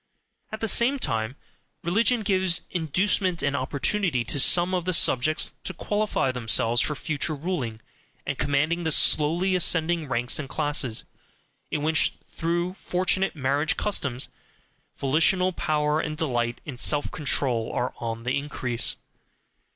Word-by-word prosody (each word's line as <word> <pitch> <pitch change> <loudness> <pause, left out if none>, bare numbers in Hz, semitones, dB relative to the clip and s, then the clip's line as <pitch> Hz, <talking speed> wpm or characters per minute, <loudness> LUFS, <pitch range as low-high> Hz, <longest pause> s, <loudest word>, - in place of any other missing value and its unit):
At 220 - -6
the 225 - 0
same 240 +6 +3
time 115 - -1 0.5
religion 225 +6 +2
gives 190 -3 +2
inducement 180 +2 +1
and 140 0 0
opportunity 140 - 0
to 125 +5 -3
some 175 +6 +4
of 180 -2 -1
the 185 -1 +1
subjects 155 +3 +2
to 185 - -4
qualify 205 -8 -1
themselves 115 -1 +1
for 150 - -1
future 155 +1 -1
ruling 140 -8 -4 0.5
and - - -2
commanding 145 +5 0
the 160 - 0
slowly 170 +6 +3
ascending 165 -2 +2
ranks 120 +2 +1
and 140 -4 -5
classes, 145 -6 0 0.6
in 150 - -2
which, 155 +1 +3
through 170 +2 -2
fortunate 185 0 -1
marriage 140 +2 0
customs, 140 -11 -2 0.7
volitional 175 +7 +2
power 150 -1 0
and 155 -1 -3
delight 120 -6 -2
in 140 -5 -7
self 145 +3 +1
control 130 -6 0
are 125 - -2
on 115 -1 -5
the 125 +2 -1
increase. 130 -5 -1
155 Hz, 135 wpm, -25 LUFS, 130-180 Hz, 0.7 s, some